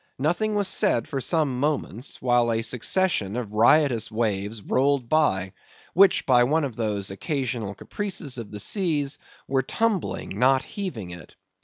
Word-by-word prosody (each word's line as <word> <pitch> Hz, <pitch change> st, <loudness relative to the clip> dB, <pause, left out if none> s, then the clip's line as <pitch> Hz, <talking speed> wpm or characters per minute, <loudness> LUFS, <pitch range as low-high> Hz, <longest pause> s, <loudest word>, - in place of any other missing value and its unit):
Nothing 175 Hz, +10 st, 0 dB
was 205 Hz, -2 st, +1 dB
said 120 Hz, -, +2 dB
for 135 Hz, -, -3 dB
some 145 Hz, -5 st, 0 dB
moments, 140 Hz, -4 st, -2 dB
while 120 Hz, -2 st, +2 dB
a 115 Hz, 0 st, 0 dB
succession 120 Hz, -, 0 dB
of 115 Hz, -4 st, -5 dB
riotous 120 Hz, +1 st, +3 dB
waves 110 Hz, -1 st, -2 dB
rolled 135 Hz, +1 st, +1 dB
by, 95 Hz, -, +1 dB, 0.4 s
which 195 Hz, +1 st, +4 dB
by 125 Hz, -2 st, +5 dB
one 155 Hz, +5 st, +1 dB
of 130 Hz, -6 st, -4 dB
those 105 Hz, -4 st, -2 dB
occasional 120 Hz, -, -3 dB
caprices 185 Hz, -, -3 dB
of 115 Hz, -, -7 dB
the 105 Hz, -, -7 dB
seas 150 Hz, -, 0 dB, 0.3 s
were 135 Hz, 0 st, +1 dB
tumbling, 195 Hz, -, -2 dB
not 130 Hz, +1 st, +4 dB
heaving 130 Hz, -, -6 dB
it. 85 Hz, -1 st, -11 dB
130 Hz, 150 wpm, -24 LUFS, 110-155 Hz, 0.4 s, by